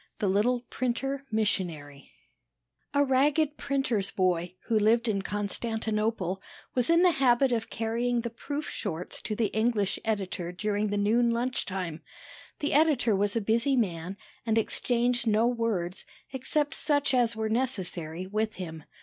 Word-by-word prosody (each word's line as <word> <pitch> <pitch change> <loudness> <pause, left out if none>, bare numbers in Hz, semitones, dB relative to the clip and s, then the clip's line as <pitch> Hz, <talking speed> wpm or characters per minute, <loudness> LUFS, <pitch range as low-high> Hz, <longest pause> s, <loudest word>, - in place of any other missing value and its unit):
THE 205 - 0
LITTLE 220 +6 +2
PRINTER 270 +3 -2
MISSIONARY 170 -10 -2 0.8
A 285 - +5
ragged 285 +3 +2
printer's 270 -9 0
boy, 180 -1 0
who 225 -2 +2
lived 230 +3 +3
in 200 -3 +1
Constantinople, 210 -1 -2 0.3
was 250 +1 +2
in 335 +1 +5
the 360 - +6
habit 265 -2 +3
of 225 -2 -1
carrying 235 +2 0
the 235 0 -4
proof 285 +5 -5
sheets 180 -4 -4
to 215 - -3
the 220 -2 0
English 220 -3 +1
editor 190 -5 -2
during 210 +3 -1
the 205 - -1
noon 230 +4 +3
lunch 245 +2 -1
time. 180 -4 -4 0.6
The 295 - 0
editor 280 -7 +4
was 205 +2 +1
a 230 - +1
busy 230 +6 +2
man, 185 -5 -1 0.3
and 225 -1 +1
exchanged 240 +1 +1
no 220 +1 +4
words, 225 -7 -1 0.3
except 290 +4 0
such 290 -3 +1
as 240 -2 +3
were 220 0 -1
necessary, 185 -8 -2
with 215 +3 -1
him. 160 -4 -7
225 Hz, 150 wpm, -28 LUFS, 195-250 Hz, 0.8 s, the